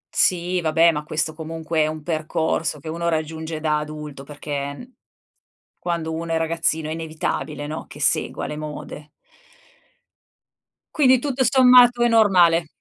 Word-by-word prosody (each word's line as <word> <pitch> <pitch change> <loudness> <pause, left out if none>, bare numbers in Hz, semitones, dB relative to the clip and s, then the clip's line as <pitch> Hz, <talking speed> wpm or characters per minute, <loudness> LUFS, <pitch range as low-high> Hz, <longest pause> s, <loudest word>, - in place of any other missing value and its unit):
Sì, 180 0 +1
vabbè, 165 +1 +4
ma 150 -1 -4
questo 155 +1 -2
comunque 160 0 -4
è 155 - +2
un 155 -1 -6
percorso 160 -1 -1
che 155 - -12
uno 170 +1 -2
raggiunge 160 0 -3
da 150 -1 0
adulto 150 -2 -8
perché 145 - -6 0.9
quando 165 -2 -3
uno 165 +1 -4
è - - +2
ragazzino 160 -1 -1
è - - -4
inevitabile, 155 -2 -4
no, 155 +1 -6
che - - -12
segua - - 0
le 150 - -5
mode. 150 -1 -8 1.9
Quindi 260 -4 +5
tutto 265 0 -1
sommato 250 -1 +6
è 240 - +4
normale. 180 -8 +4
160 Hz, 140 wpm, -22 LUFS, 155-170 Hz, 1.9 s, sommato